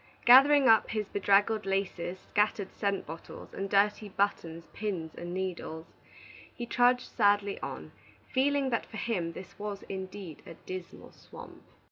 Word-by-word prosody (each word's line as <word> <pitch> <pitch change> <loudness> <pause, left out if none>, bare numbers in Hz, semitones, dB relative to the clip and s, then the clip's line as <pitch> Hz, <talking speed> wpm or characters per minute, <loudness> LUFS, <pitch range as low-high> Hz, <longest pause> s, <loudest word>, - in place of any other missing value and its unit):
Gathering 275 +2 +8
up 225 -1 +5
his 215 -2 -2
bedraggled 205 +2 +2
laces, 190 -2 -2
scattered 205 0 -1
scent 200 -2 -1
bottles, 165 +2 -10
and 195 0 -4
dirty 205 +1 +2
buttons, 170 -4 -2
pins, 185 -7 -4
and 175 0 -7
needles, 180 -3 -4 0.7
he 240 - -5
trudged 245 +1 +3
sadly 205 -2 +2
on, 130 - -7 0.4
feeling 275 0 +2
that 230 - -1
for 220 - -9
him 185 -7 -2
this 185 +3 -11
was 205 -1 -5
indeed 190 -3 -7
a 165 - -9
Dismal 185 +1 -9
Swamp. - - -13
200 Hz, 140 wpm, -30 LUFS, 180-220 Hz, 0.7 s, Gathering